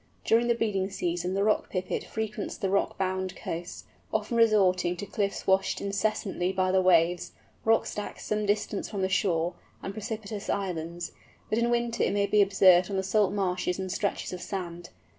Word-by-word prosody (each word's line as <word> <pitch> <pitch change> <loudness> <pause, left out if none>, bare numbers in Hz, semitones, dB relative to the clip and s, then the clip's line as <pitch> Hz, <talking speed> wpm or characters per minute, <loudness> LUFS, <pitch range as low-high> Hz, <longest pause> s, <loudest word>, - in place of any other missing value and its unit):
During 230 +1 +4
the 235 - +3
breeding 200 -4 0
season 180 -1 -2
the 200 - +1
Rock 215 0 +1
Pipit 185 -1 -2
frequents 215 -2 -4
the 195 - -1
rock 200 - +1
bound 190 -1 -2
coasts, 170 +2 -6 0.3
often 240 - -1
resorting 190 -6 +3
to 205 - -5
cliffs 200 0 -2
washed 190 0 +2
incessantly 200 -2 -1
by 185 -1 +1
the 190 0 +4
waves, 175 -1 +3 0.3
rock 225 0 +3
stacks 210 - -6
some 210 -1 -1
distance 205 0 -1
from 195 -3 -1
shore, 175 -3 +1 0.3
and 195 - -4
precipitous 215 -1 -5
islands; 175 -3 -3 0.4
but 220 - +2
in 235 0 +2
winter 235 -1 0
it - - +2
may 200 0 +2
be 205 +1 +4
observed 185 -2 +5
on 195 - -2
the 190 - 0
salt 190 0 +2
marshes 180 -3 -1
and 190 -1 -4
stretches 200 -1 -2
of 180 - -6
sand. 175 -2 -5
195 Hz, 180 wpm, -28 LUFS, 180-210 Hz, 0.4 s, observed